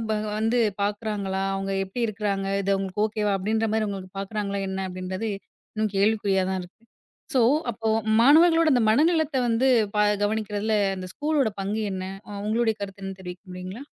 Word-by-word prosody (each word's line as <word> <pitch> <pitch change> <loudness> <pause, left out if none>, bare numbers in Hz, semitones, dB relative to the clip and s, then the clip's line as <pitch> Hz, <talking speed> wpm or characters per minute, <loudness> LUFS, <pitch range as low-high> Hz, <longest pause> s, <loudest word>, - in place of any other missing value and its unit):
வ - - +2 0.2
வந்து 225 +3 +1 0.2
பாக்குறாங்களா? 205 -2 -2
அவுங்க 195 0 -3
எப்டி 195 +6 -6
இருக்காங்க? 200 -2 -2 0.2
இது 195 - -1
அவுங்களுக்கு 195 +1 -2
ஓகேவா 210 -1 -1
அப்டின்ற 220 +3 0
மாதிரி 220 -1 +1
உங்களுக்குப் 195 -1 -7
பாக்குறாங்களா? 200 0 -3
என்ன 190 0 -3
அப்படின்றது 185 +4 -4 0.5
இன்னும் 215 -1 -1
கேள்விக் 210 +2 +2
குறியாதான் 190 -1 +1
இருக்கு. 180 - -14 0.6
சோ 255 - +4 0.3
அப்போ 225 0 -3 0.3
மாணவர்களோட 325 +5 +6
அந்த 245 -2 +3
மனநிலத்த 315 +4 +3
வந்து 230 +3 +2 0.3
பா 210 - +3 0.2
கவனிக்கறதுல 210 0 0 0.2
அந்த 185 -1 -6
ஸ்கூல்லோட 295 -5 +1
பங்கு 205 +3 -2
என்ன? 185 0 -4 0.4
உங்களோட 225 +2 +1
கருத்து 195 -1 -7
என்ன? 195 0 -4
தெரிவிக்க 180 -1 -8
முடியுங்களா? 185 +7 -7
210 Hz, 155 wpm, -25 LUFS, 195-225 Hz, 0.6 s, மாணவர்களோட